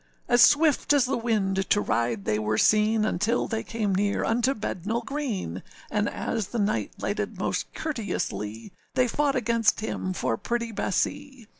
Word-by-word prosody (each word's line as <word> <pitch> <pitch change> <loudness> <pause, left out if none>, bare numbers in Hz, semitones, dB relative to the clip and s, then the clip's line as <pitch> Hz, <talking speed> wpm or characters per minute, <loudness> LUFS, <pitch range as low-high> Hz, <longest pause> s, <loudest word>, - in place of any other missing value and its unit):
As 240 - +4
swift 295 -1 +5
as 285 -3 +4
the 265 - 0
wind 195 -5 0
to 205 - +4
ride 115 - -1
they 105 0 +1
were 110 0 0
seen, 215 0 +3
Until 215 +4 0
they 225 -1 -2
came 215 -4 -2
near 200 +2 +1
unto 240 +4 +1
Bednall 220 +3 -3
Green, 230 - -3 0.3
And 210 0 +1
as 220 -4 -3
the 240 - -5
knight 210 0 0
lighted - - -3
most - - -2
courteously, 115 - -4 0.2
They 255 -1 +3
fought 285 +3 +1
against 230 -3 +2
him 185 -3 -3
for 115 -10 -1
pretty 235 - -2
Bessee. 270 +5 -2
220 Hz, 160 wpm, -26 LUFS, 190-245 Hz, 0.3 s, swift